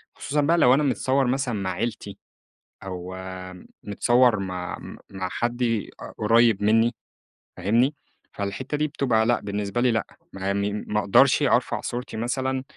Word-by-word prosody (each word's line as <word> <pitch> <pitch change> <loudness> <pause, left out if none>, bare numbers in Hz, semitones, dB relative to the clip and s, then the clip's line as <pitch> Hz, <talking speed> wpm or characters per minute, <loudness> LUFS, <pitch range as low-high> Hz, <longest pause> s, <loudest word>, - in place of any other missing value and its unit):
خصوصًا 150 +1 -1
بقى 165 +4 +3
لو 125 -6 +6
أنا 145 +3 +3
متصوَر 135 -1 +1
مثلًا 130 -1 0
مع 95 -2 -2
عيلتي، 110 -4 -4 0.7
أو 90 -1 -6 0.7
متصوَر 120 +2 +3
مع 90 -2 -4
م - - -10
مع 95 -1 -4
حد 120 +4 -2
أ 115 -3 -2
قريّب 115 -1 +3
مِنّي، 115 +3 +3 0.6
فاهمني؟ 115 +10 +2 0.4
فالحتّة 100 +8 -4
دي 150 +1 +1
بتبقى 120 -6 +1
لأ 120 +1 +2
بالنسبة 100 +2 -2
لي 125 0 +3
لأ، 115 -2 0 0.3
ما 95 +1 -2
مي 100 +1 -1
ما 105 0 -2
أقدرش 100 -2 +4
أرفع - - +1
صورتي 120 -2 -5
مثلًا، 130 +3 -2
115 Hz, 150 wpm, -24 LUFS, 100-125 Hz, 0.7 s, لو